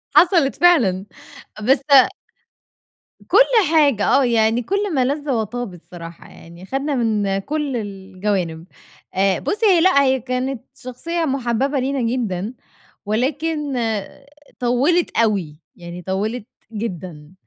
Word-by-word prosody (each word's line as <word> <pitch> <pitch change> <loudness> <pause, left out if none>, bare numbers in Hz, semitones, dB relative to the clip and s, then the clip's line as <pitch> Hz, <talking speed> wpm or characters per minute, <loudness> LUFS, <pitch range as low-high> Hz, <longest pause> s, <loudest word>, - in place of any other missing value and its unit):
حصلت 340 -6 +4
فعلًا 225 - +3 0.6
بس 265 +4 +4 1.5
كل 410 - +4 0.3
حاجة. 280 -9 +4
آه، 275 - +4
يعني 230 0 +2
كل 400 - -2
ما 260 -4 +2
لذ 290 +2 -2
وطاب 230 -2 -3
الصراحة 170 -1 -12
يعني، 170 +2 -14
خدنا 275 +6 -2
من 210 -5 0
كل 285 +3 -3
الجوانب. 190 -5 -4 0.5
آآ، 190 -1 +1
بُصي، 425 +2 -1
هي 365 -5 +5
لأ، 360 -6 +5
هي 265 -1 +2
كانت 255 0 -3 0.2
شخصية 330 +7 -4
محببة 270 0 -1
لينا 270 +1 -1
جدًا، 230 -4 -2 0.5
ولكن 285 +6 -1 0.9
طوِّلت 265 +9 +1
أوي، 195 -9 0 0.2
يعني 175 0 -9
طوِّلت 205 +5 -3 0.3
جدًا 180 -7 -6
240 Hz, 115 wpm, -20 LUFS, 195-280 Hz, 1.5 s, هي